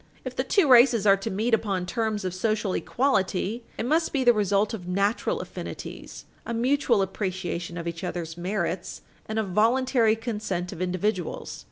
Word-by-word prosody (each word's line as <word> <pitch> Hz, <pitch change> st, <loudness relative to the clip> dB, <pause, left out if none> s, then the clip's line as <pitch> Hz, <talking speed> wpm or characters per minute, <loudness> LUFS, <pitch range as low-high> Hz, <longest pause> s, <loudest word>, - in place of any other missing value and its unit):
If -, -, -5 dB
the -, -, 0 dB
two 390 Hz, -7 st, +3 dB
races 240 Hz, -4 st, +6 dB
are 195 Hz, -1 st, +7 dB
to 195 Hz, +3 st, -4 dB
meet 220 Hz, +5 st, -1 dB
upon 195 Hz, -5 st, +1 dB
terms 215 Hz, -1 st, -2 dB
of 185 Hz, -, -2 dB
social 210 Hz, 0 st, 0 dB
equality, 225 Hz, -3 st, 0 dB, 0.2 s
it -, -, -2 dB
must 320 Hz, +6 st, +1 dB
be 275 Hz, -3 st, 0 dB
the 240 Hz, -1 st, +6 dB
result 205 Hz, 0 st, +1 dB
of 180 Hz, -5 st, -6 dB
natural 200 Hz, -, 0 dB
affinities, -, -, -8 dB, 0.2 s
a 235 Hz, -, -4 dB
mutual 240 Hz, -3 st, +2 dB
appreciation 180 Hz, -3 st, -4 dB
of 170 Hz, 0 st, -5 dB
each 170 Hz, -1 st, -5 dB
other's 165 Hz, -2 st, -4 dB
merits, 175 Hz, -1 st, -3 dB, 0.2 s
and 220 Hz, -, -3 dB
a 220 Hz, -, +2 dB
voluntary 225 Hz, +3 st, +3 dB
consent 210 Hz, -6 st, -3 dB
of 180 Hz, -3 st, -7 dB
individuals. 215 Hz, -, -2 dB
210 Hz, 170 wpm, -26 LUFS, 185-235 Hz, 0.2 s, are